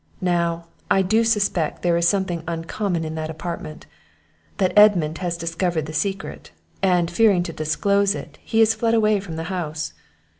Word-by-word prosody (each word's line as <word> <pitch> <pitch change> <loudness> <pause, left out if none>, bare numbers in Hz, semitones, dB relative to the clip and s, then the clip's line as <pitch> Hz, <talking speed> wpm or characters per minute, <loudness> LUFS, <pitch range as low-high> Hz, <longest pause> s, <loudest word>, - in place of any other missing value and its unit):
Now, 170 -2 0 0.2
I 195 - +4
do 220 +5 +2
suspect 205 -7 0
there 175 -1 +2
is 170 0 +2
something 185 -3 0
uncommon 170 +1 -2
in 155 - -4
that 155 0 -4
apartment 160 -1 -6 0.7
that 185 -3 +1
Edmund 180 -7 +5
has 175 -2 -2
discovered 165 -1 -1
the 155 - -8
secret; 195 +5 -3 0.3
and, 180 -3 +2
fearing 195 -2 +3
to 165 - -6
disclose 200 +7 +1
it, - - -9
he 225 - +1
is 225 0 +5
fled 230 +1 +1
away 215 -2 +3
from 185 -5 -7
the 165 - -4
house. 155 -4 -4
175 Hz, 165 wpm, -22 LUFS, 165-200 Hz, 0.7 s, Edmund